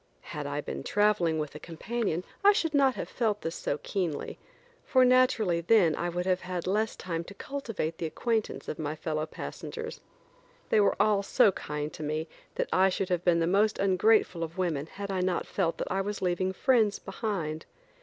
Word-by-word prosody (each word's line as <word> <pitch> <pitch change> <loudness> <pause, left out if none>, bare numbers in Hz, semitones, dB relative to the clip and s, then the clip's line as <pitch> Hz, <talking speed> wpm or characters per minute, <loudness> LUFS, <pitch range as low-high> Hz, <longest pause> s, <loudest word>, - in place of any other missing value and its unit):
Had - - -4
I - - -2
been 70 0 -5
traveling 205 - +2
with 150 -2 -3
a 150 - -8
companion 180 +2 -3 0.2
I 410 +1 +8
should 325 -5 0
not 270 -3 +4
have - - -4
felt 215 -3 -1
this 165 - -3
so 145 - -2
keenly, 175 -7 -3 0.4
for 255 -2 +4
naturally 240 -9 +3
then 170 -3 +4
I 175 - -2
would 175 +1 -2
have 185 -1 +1
had 180 -1 -4
less 215 +4 0
time 170 -2 -4
to 200 - -11
cultivate 225 - -4
the 165 - -1
acquaintance 225 +6 -2
of 155 - -5
my 155 0 -2
fellow 155 0 -2
passengers. 460 0 -7 0.7
They - - +4
were 200 - +3
all 205 -1 +4
so 200 +1 +4
kind 150 -3 -5
to - - -9
me 155 +2 -2 0.3
that - - -1
I 190 +1 +5
should 185 0 -2
have 175 -1 0
been 170 -2 +3
the - - +3
most 200 +5 +2
ungrateful 195 -2 +3
of 165 +2 -6
women 160 -5 -1
had 200 +3 -6
I 190 - -1
not 180 -1 0
felt 170 -4 -1
that - - -4
I 190 +1 +1
was 205 +1 -3
leaving 185 +1 0
friends 220 0 +2
behind. 190 -7 -4
185 Hz, 195 wpm, -29 LUFS, 165-215 Hz, 0.7 s, I